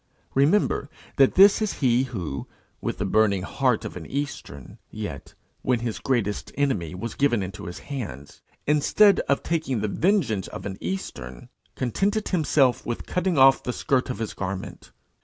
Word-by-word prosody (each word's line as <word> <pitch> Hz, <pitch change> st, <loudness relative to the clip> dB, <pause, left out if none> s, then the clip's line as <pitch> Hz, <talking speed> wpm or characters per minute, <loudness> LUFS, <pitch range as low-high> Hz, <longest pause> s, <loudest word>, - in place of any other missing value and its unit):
Remember 145 Hz, 0 st, +2 dB, 0.3 s
that 135 Hz, -1 st, +5 dB
this 200 Hz, +3 st, +7 dB
is 215 Hz, -, 0 dB
he 125 Hz, -1 st, +3 dB
who, 90 Hz, -, -5 dB, 0.3 s
with -, -, -3 dB
the 100 Hz, -, -2 dB
burning 100 Hz, -1 st, +2 dB
heart 125 Hz, +2 st, 0 dB
of -, -, -6 dB
an 85 Hz, -3 st, -7 dB
eastern, 135 Hz, -, -6 dB
yet, -, -, -7 dB, 0.3 s
when 125 Hz, -3 st, +1 dB
his 120 Hz, -2 st, -3 dB
greatest 115 Hz, -6 st, -1 dB
enemy 105 Hz, -, -1 dB
was 110 Hz, +4 st, -5 dB
given 120 Hz, -7 st, +1 dB
into 95 Hz, -1 st, -7 dB
his 85 Hz, -, -6 dB
hands, 100 Hz, -, -7 dB, 0.2 s
instead 175 Hz, +8 st, +4 dB
of 140 Hz, -, +2 dB
taking 155 Hz, -8 st, -1 dB
the 105 Hz, -, 0 dB
vengeance 135 Hz, -, +1 dB
of 90 Hz, -, -8 dB
an 95 Hz, -1 st, -5 dB
eastern, 65 Hz, -9 st, -6 dB, 0.3 s
contented 200 Hz, -, 0 dB
himself 150 Hz, -7 st, +2 dB
with 120 Hz, -, -4 dB
cutting 180 Hz, -2 st, 0 dB
off 135 Hz, 0 st, +6 dB
the 125 Hz, -, -3 dB
skirt 130 Hz, +1 st, 0 dB
of 125 Hz, -, -3 dB
his 110 Hz, -1 st, -4 dB
garment. 95 Hz, 0 st, -6 dB
125 Hz, 160 wpm, -25 LUFS, 95-145 Hz, 0.3 s, this